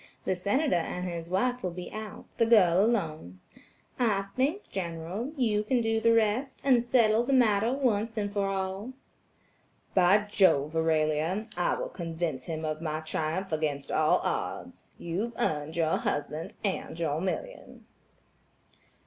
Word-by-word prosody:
The - - +1
Senator 205 - +1
and 180 +2 -3
his 170 -1 -5
wife 245 +7 0
will 180 - -1
be 180 +1 -7
out, 215 -1 -7
the 230 - +5
girl 190 -5 +5
alone. 155 - -1 0.6
I 200 -5 +1
think, 295 +11 0
General, 180 - -4
you 220 -5 +2
can 240 +4 +1
do 225 0 0
the 230 - +4
rest, 230 +4 +1
and 255 -3 +4
settle 235 -2 +3
the 275 +3 0
matter 225 -3 +4
once 230 -5 0 0.2
for 200 -1 0
all." 195 +4 -3 1.0
"By 190 +3 +5
jove, 165 -7 +3
Aurelia, 160 +4 +1
I 175 - +1
will - - -4
convince 165 -6 -4
him 160 -1 -3
of 155 0 -3
my 155 -1 -2
triumph 160 +4 -3
against 150 -3 -2
all 155 0 +3
odds. - - -4
You've 195 +8 -3
earned 150 +1 -1
your 165 -1 +2
husband 155 +7 -3
and 190 -4 -3
your 160 -1 -1
million." - - -5
190 Hz, 145 wpm, -29 LUFS, 160-225 Hz, 1.0 s, the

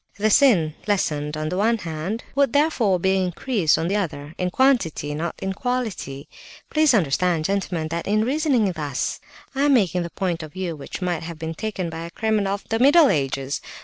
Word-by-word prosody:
The 215 +1 +1
sin, 195 - +4
lessened 150 -7 0
on 155 0 -2
the 180 - -3
one 225 +4 +2
hand, 170 +4 -4
would 275 -3 +2
therefore 260 - +2
be 190 +2 +2
increased 180 - +1
on 165 - -1
the 200 +3 +1
other, 150 -6 -4
in 180 - 0
quantity, 180 - +1
not 165 +3 -3
in 190 0 -3
quality. 220 - -3 0.4
Please 305 -4 +4
understand, 170 -1 +1
gentlemen, 180 -5 -1
that 170 +1 -4
in 215 +2 +2
reasoning 265 - +1
thus, 150 -6 -3 0.3
I 270 - -2
am 285 -2 +5
taking 180 -6 +2
the 170 - -4
point 175 -2 -2
of 155 -2 -9
view 180 -3 -3
which 150 +5 -7
might 175 -2 -1
have 170 0 -7
been 160 0 -4
taken 185 -2 -4
by 165 +1 -6
a 170 - -6
criminal 210 0 0
of 200 - -10
the 225 - 0
middle 285 +3 +6
ages. 135 -1 -1
185 Hz, 195 wpm, -23 LUFS, 160-225 Hz, 0.4 s, middle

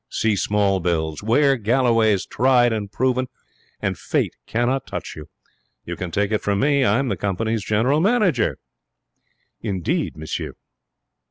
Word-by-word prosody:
See 110 -2 +1
small 100 -1 +1
bills. 80 -3 -1
Wear 135 +6 +3
Galloway's 115 -3 +2
Tried 125 -1 +3
and 105 -2 -4
Proven, 130 +1 0 0.5
and - - -2
fate - - -1
cannot 120 +3 0
touch - - -6
you. 75 -1 -10 0.6
You 85 - -5
can 90 +1 -5
take 100 +5 -1
it 110 - 0
from 100 -1 0
me. 140 +1 +3
I'm 125 +4 +2
the 100 - 0
company's 105 +4 -2
general 115 +8 +2
manager.' 195 - +2 1.0
'Indeed, 95 -6 -2
monsieur!' 80 0 -5
110 Hz, 140 wpm, -22 LUFS, 100-130 Hz, 1.0 s, Wear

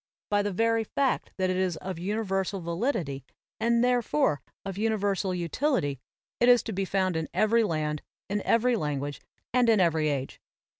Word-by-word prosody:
By 205 0 +3
the 205 0 -1
very 225 +3 +2
fact 270 +4 -1
that 185 -1 +1
it 185 - -1
is 185 -3 0
of 185 -1 -6
universal 195 0 -1
validity, 170 - -2 0.4
and 235 +1 +3
therefore 220 -12 +2 0.2
of 195 -1 -4
universal 205 -2 0
utility, 170 - 0 0.4
it 240 - +5
is 245 -2 +6
to 225 - -4
be 195 +1 -1
found 185 -2 0
in 160 -1 -2
every 225 +2 +4
land, 155 -5 -1 0.3
in 205 +1 -1
every 240 +3 +3
language 145 -6 -3 0.3
and 245 -2 +4
in 220 -2 +5
every 160 -4 +2
age. 135 -2 -3
195 Hz, 165 wpm, -28 LUFS, 165-225 Hz, 0.4 s, is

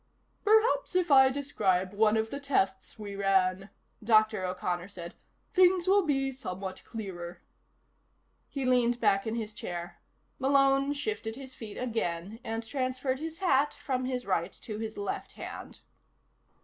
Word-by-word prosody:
"Perhaps 435 -2 +3
if 355 -3 +2
I 265 -1 +8
describe 190 -9 0
one 215 +1 +3
of 220 0 -1
the 280 - -4
tests 195 -9 0
we 205 -2 -7
ran," 195 -1 +1 0.3
Dr. 215 -2 +4
O'Connor 180 -1 -2
said, 175 -4 -8 0.4
"things 365 -1 +4
will 400 +2 +5
be 270 -4 0
somewhat 190 -7 -6
clearer." 180 -6 -7 1.1
He 275 -2 -3
leaned 245 -1 +3
back 195 -1 +2
in 220 - -1
his 220 -2 -4
chair. 175 -5 -6 0.4
Malone 275 +1 +3
shifted 285 - -3
his 260 0 -9
feet 220 -4 -8
again 220 -4 -3
and 225 0 -3
transferred 260 0 -1
his 320 +1 -5
hat 295 -6 +2
from 255 -2 -2
his 255 -1 -2
right 185 -1 0
to 215 -2 -5
his 220 -1 -5
left 200 -1 -4
hand. - - -8
225 Hz, 145 wpm, -30 LUFS, 195-275 Hz, 1.1 s, I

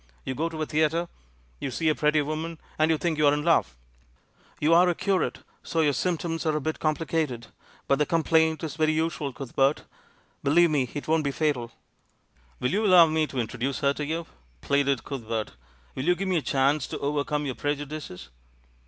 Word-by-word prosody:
You 130 - -2
go 160 +5 -1
to 160 -1 -7
a 155 - 0
theatre, 155 +3 +1 0.5
you - - -3
see 160 +5 -2
a 155 - +5
pretty 150 0 +2
woman, 160 +2 -4 0.2
and 155 +1 +4
you 160 - +3
think 160 -1 -1
you're 145 -1 +5
in 150 - -2
love. 155 - +2 0.8
You're 170 +4 +5
a 175 - 0
curate, 195 -1 -1 0.2
so 165 - -1
your 150 -2 +3
symptoms 165 0 -1
are 155 - +1
a - - 0
bit 155 +2 -3
complicated, 155 -6 -1 0.4
but 140 - +2
the 150 - +2
complaint's 160 -2 +1
very 155 0 +2
usual, 160 -2 -1
Cuthbert, 135 +2 0 0.6
believe 165 +4 +4
me 135 -5 +1
— - - -18
it 145 - -5
won't 160 0 +2
be 140 - 0
fatal." 140 -5 -1 0.9
"Will 125 - 0
you 205 +4 +1
allow 180 -3 +8
me 155 -1 +1
to 135 - -8
introduce 125 +3 -2
her 140 -1 +3
to 150 - -4
you?" 165 +3 -3 0.4
pleaded 140 -2 +1
Cuthbert. 115 -5 -4 0.4
"Will 130 - -4
you 180 +1 +4
give 195 +2 -3
me 185 - +2
a - - 0
chance 140 +1 +1
to - - -5
overcome 145 +1 -1
your 135 - -2
prejudices?" 145 - -5
155 Hz, 190 wpm, -26 LUFS, 140-160 Hz, 0.9 s, allow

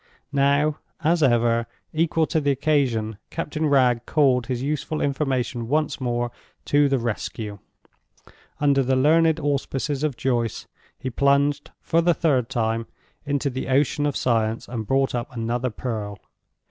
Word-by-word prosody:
Now, 140 +2 +2 0.2
as 165 +2 +2
ever, 115 -3 +3 0.3
equal 160 0 +2
to 160 0 0
the 145 - +1
occasion, 130 -7 +1
Captain 155 +1 -2
Wragge 125 -4 +3
called 130 -5 +3
his 125 -1 -2
useful 150 +2 -2
information 130 -4 -1
once 150 +1 0
more 120 -1 -1 0.3
to 145 0 +3
the 135 - +2
rescue. 110 -3 -4 1.0
Under 140 -2 +3
the 130 0 +1
learned 160 +4 +4
auspices 145 -1 -1
of 145 -6 -1
Joyce, 120 -2 -1 0.3
he 130 - -5
plunged, 140 +2 +2
for 165 - +2
the 170 0 +3
third 130 -7 +1
time, 115 -3 -1 0.4
into 140 -1 0
the 130 +1 -4
ocean 145 +2 +2
of 145 - -1
science, 115 -2 0
and 115 -4 -5
brought 135 0 +1
up 120 +3 -3
another 120 +1 -2
pearl. 110 -3 -4
135 Hz, 145 wpm, -24 LUFS, 120-145 Hz, 1.0 s, learned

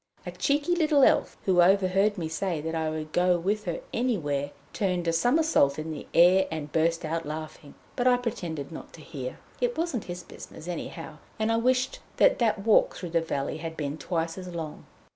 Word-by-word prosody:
A 180 - -4
cheeky 285 - +1
little 305 -5 +4
Elf, - - +3
who 180 -2 +4
overheard 195 +2 +3
me 165 -3 -2
say 165 +1 -2
that 160 +2 -4
I 160 -1 -1
would 155 0 -5
go 180 +1 +3
with 205 +5 -1
her - - -3
anywhere, 150 - 0 0.2
turned 180 -4 -1
a 165 - +2
somersault 245 - +3
in 155 +1 -4
the 150 - -7
air 185 +3 +6
and 150 -2 -5
burst 165 +1 +1
out 165 +1 -2
laughing, 155 -1 -7 0.2
but 245 - +1
I 250 -1 +5
pretended 170 - -4
not 160 - -9
to 165 - -12
hear. 130 -4 -6 0.2
It 485 -1 0
wasn't 325 - -2
his 175 0 -6
business, 160 - -11
anyhow, 165 -2 -6 0.2
and 220 +1 0
I 225 - +2
wished 255 +2 +1 0.2
that - - +5
that 215 -4 +1
walk 220 - +4
through 175 -3 -6
the 165 0 +2
valley 140 -4 -3
had 160 0 -6
been 150 0 -3
twice 165 0 -2
as 185 - -8
long. 165 -4 -6
175 Hz, 200 wpm, -27 LUFS, 160-220 Hz, 0.2 s, air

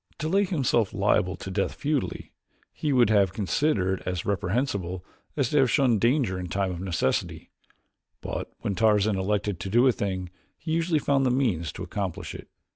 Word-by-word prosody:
To 155 - -3
lay 195 +5 +3
himself 130 - 0
liable 100 -2 +2
to 95 - -7
death 95 +1 -1
futilely, 145 -2 -2 0.4
he 150 - -2
would 120 -5 +4
have 100 -3 +3
considered 95 - 0
as 90 -2 -3
reprehensible 100 -3 -1 0.3
as 135 -5 +1
to 150 - +3
have 130 -2 +4
shunned 120 -5 +3
danger 120 -7 +2
in 90 - -5
time 95 +1 -1
of 85 - -5
necessity; 95 -3 -2 0.7
but - - -5
when - - -1
Tarzan 105 0 +3
elected 100 -1 -1
to 95 - -5
do 120 +5 +4
a 130 - +6
thing 95 -6 -3 0.3
he 160 - -6
usually 165 0 +1
found 140 -2 +2
the 130 - +3
means 110 - 0
to - - -7
accomplish 95 -3 -4
it. - - -10
105 Hz, 180 wpm, -26 LUFS, 95-135 Hz, 0.7 s, a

